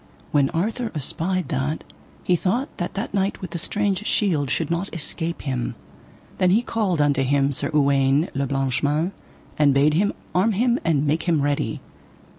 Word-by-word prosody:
When 140 Hz, -2 st, +3 dB
Arthur 220 Hz, +7 st, -2 dB
espied 170 Hz, +5 st, -2 dB
that, 145 Hz, +1 st, -2 dB, 0.4 s
he 180 Hz, -, +3 dB
thought 220 Hz, -, -1 dB
that 175 Hz, -, -4 dB
that 200 Hz, +1 st, -4 dB
knight 195 Hz, 0 st, 0 dB
with 185 Hz, -3 st, -7 dB
the 170 Hz, -, -3 dB
strange 205 Hz, +2 st, -1 dB
shield 160 Hz, -, +2 dB
should -, -, -1 dB
not 170 Hz, +4 st, -2 dB
escape 165 Hz, +1 st, -2 dB
him. 130 Hz, -4 st, -2 dB, 0.6 s
Then 185 Hz, -, +4 dB
he 215 Hz, +6 st, +3 dB
called 205 Hz, -9 st, 0 dB
unto 145 Hz, -2 st, +3 dB
him 140 Hz, +1 st, +2 dB
Sir 135 Hz, -, -1 dB
Uwaine 140 Hz, +1 st, +3 dB
le 140 Hz, 0 st, -1 dB
Blanche 135 Hz, -1 st, 0 dB
Mains, 150 Hz, +5 st, +1 dB, 0.5 s
and 145 Hz, -2 st, +4 dB
bade 145 Hz, +2 st, +4 dB
him 200 Hz, +6 st, +2 dB, 0.2 s
arm 195 Hz, +5 st, +3 dB
him 240 Hz, +4 st, +2 dB
and 155 Hz, -3 st, +2 dB
make 155 Hz, +4 st, 0 dB
him 155 Hz, -4 st, +2 dB
ready. 145 Hz, 0 st, -1 dB
165 Hz, 175 wpm, -23 LUFS, 140-190 Hz, 0.6 s, Then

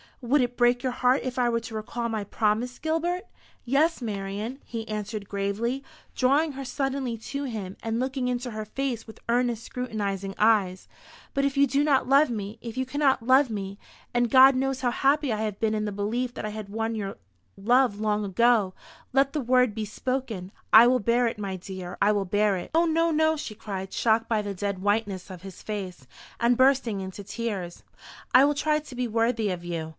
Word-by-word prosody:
"Would 265 Hz, +4 st, +3 dB
it 245 Hz, 0 st, -1 dB
break 245 Hz, +1 st, +3 dB
your 260 Hz, -, 0 dB
heart 250 Hz, +1 st, +2 dB
if 255 Hz, 0 st, -3 dB
I 245 Hz, -1 st, +3 dB
were 230 Hz, 0 st, +1 dB
to 225 Hz, 0 st, -9 dB
recall 235 Hz, +2 st, -3 dB
my 220 Hz, -2 st, -2 dB
promise, 220 Hz, +4 st, -1 dB
Gilbert?" 340 Hz, +5 st, -1 dB, 0.4 s
"Yes, 280 Hz, +3 st, +2 dB
Marian," 210 Hz, +4 st, -4 dB
he 225 Hz, -1 st, -6 dB
answered 210 Hz, -1 st, -4 dB
gravely, 210 Hz, +7 st, -2 dB, 0.3 s
drawing 285 Hz, +5 st, +3 dB
her 275 Hz, 0 st, -7 dB
suddenly 270 Hz, -3 st, -2 dB
to 280 Hz, +5 st, -5 dB
him, 210 Hz, -7 st, -5 dB
and 225 Hz, 0 st, -2 dB
looking 260 Hz, 0 st, -1 dB
into 245 Hz, 0 st, -2 dB
her 215 Hz, 0 st, -4 dB
face 240 Hz, 0 st, -3 dB
with 220 Hz, -, -12 dB
earnest 240 Hz, -1 st, +1 dB
scrutinising 200 Hz, -6 st, -4 dB
eyes; 205 Hz, -4 st, +2 dB, 0.5 s
"but 275 Hz, -, +1 dB
if 280 Hz, 0 st, -1 dB
you 280 Hz, -, +6 dB
do 280 Hz, +2 st, +1 dB
not 280 Hz, -4 st, +2 dB
love 275 Hz, +3 st, +5 dB
me, 215 Hz, -1 st, -5 dB
if 235 Hz, 0 st, -7 dB
you 260 Hz, -, 0 dB
cannot 270 Hz, -3 st, +1 dB
love 260 Hz, +1 st, +5 dB
me 200 Hz, -2 st, -5 dB, 0.3 s
and 240 Hz, -1 st, +2 dB
God 265 Hz, +2 st, +8 dB
knows 265 Hz, 0 st, -1 dB
how 245 Hz, -2 st, +1 dB
happy 280 Hz, 0 st, +2 dB
I -, -, -1 dB
have 210 Hz, -2 st, -3 dB
been 220 Hz, -1 st, +1 dB
in 215 Hz, 0 st, -1 dB
the 210 Hz, -, -2 dB
belief 230 Hz, +5 st, -2 dB
that -, -, -5 dB
I -, -, -2 dB
had 210 Hz, -1 st, -7 dB
won 225 Hz, +2 st, -2 dB
your 200 Hz, -3 st, -4 dB, 0.4 s
love 240 Hz, +1 st, +3 dB
long 210 Hz, -1 st, 0 dB
ago 205 Hz, 0 st, +3 dB, 0.4 s
let 275 Hz, +1 st, +3 dB
the 300 Hz, -, -1 dB
word 250 Hz, -2 st, +3 dB
be 215 Hz, 0 st, -3 dB
spoken. 220 Hz, -4 st, -4 dB, 0.2 s
I 220 Hz, +2 st, +10 dB
will 250 Hz, +1 st, +4 dB
bear 235 Hz, +3 st, +2 dB
it, 230 Hz, -, -4 dB
my 195 Hz, -2 st, -3 dB
dear, 185 Hz, -1 st, -7 dB
I 205 Hz, -, +5 dB
will 205 Hz, -2 st, 0 dB
bear 205 Hz, +1 st, +2 dB
it." 180 Hz, -, -7 dB
"O 335 Hz, +1 st, +5 dB
no, 330 Hz, +1 st, +2 dB
no," 315 Hz, 0 st, +2 dB
she 265 Hz, -8 st, -6 dB
cried, 195 Hz, -2 st, -6 dB
shocked 225 Hz, 0 st, +2 dB
by 220 Hz, -2 st, +1 dB
the 205 Hz, -1 st, -4 dB
dead 200 Hz, 0 st, -3 dB
whiteness 205 Hz, -2 st, -1 dB
of 180 Hz, -2 st, -9 dB
his 195 Hz, -2 st, -10 dB
face, 190 Hz, -9 st, -5 dB, 0.3 s
and 235 Hz, +1 st, +3 dB
bursting 260 Hz, -6 st, +3 dB
into 190 Hz, +1 st, -7 dB
tears. 200 Hz, -5 st, -4 dB, 0.5 s
"I 265 Hz, -, +8 dB
will 290 Hz, -, +2 dB
try 305 Hz, +1 st, +1 dB
to 295 Hz, -4 st, -11 dB
be 250 Hz, 0 st, -1 dB
worthy 225 Hz, -1 st, +1 dB
of 180 Hz, -2 st, -4 dB
you. 165 Hz, -2 st, -4 dB
230 Hz, 205 wpm, -26 LUFS, 205-260 Hz, 0.5 s, I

